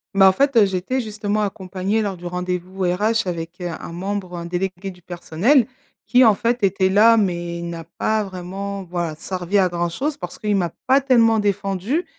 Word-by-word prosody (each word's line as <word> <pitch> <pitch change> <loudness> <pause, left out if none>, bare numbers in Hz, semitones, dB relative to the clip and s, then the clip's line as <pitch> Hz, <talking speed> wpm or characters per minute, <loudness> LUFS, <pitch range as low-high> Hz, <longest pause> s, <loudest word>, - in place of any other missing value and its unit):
Bah, 195 -1 +7
en - - +4
fait, 275 +6 +1
heu, 220 -3 +7
j'étais 195 +7 -1
justement 215 -1 -2
accompagnée 195 +1 -2
lors 200 -3 -2
du 175 0 -12
rendez-vous 180 +1 -3
RH 210 +4 +1
avec, 170 0 -5
heu, 180 - -3
un - - -9
membre, 185 0 -4
un 170 - -5
délégué 180 +2 -3
du 180 -1 -13
personnel. 180 - +1 0.4
Qui, 250 +1 +5
en 220 -4 +6
fait, 235 +2 -1
était 190 -1 +3
là, 215 +4 +6
mais 175 -4 -1
il 170 0 -5
n'a 165 -1 -6
pas 215 0 +1
vraiment, 195 +1 -6
voilà, 175 -3 -3
servi 185 +4 -2
à 190 -2 +4
grand-chose 175 - -2
parce 180 -2 -7
qu'il 210 -1 0
m'a 175 -3 0 0.2
pas 265 +2 +5
tellement 230 -4 +4
défendue 205 - -1
195 Hz, 190 wpm, -21 LUFS, 180-215 Hz, 0.4 s, Bah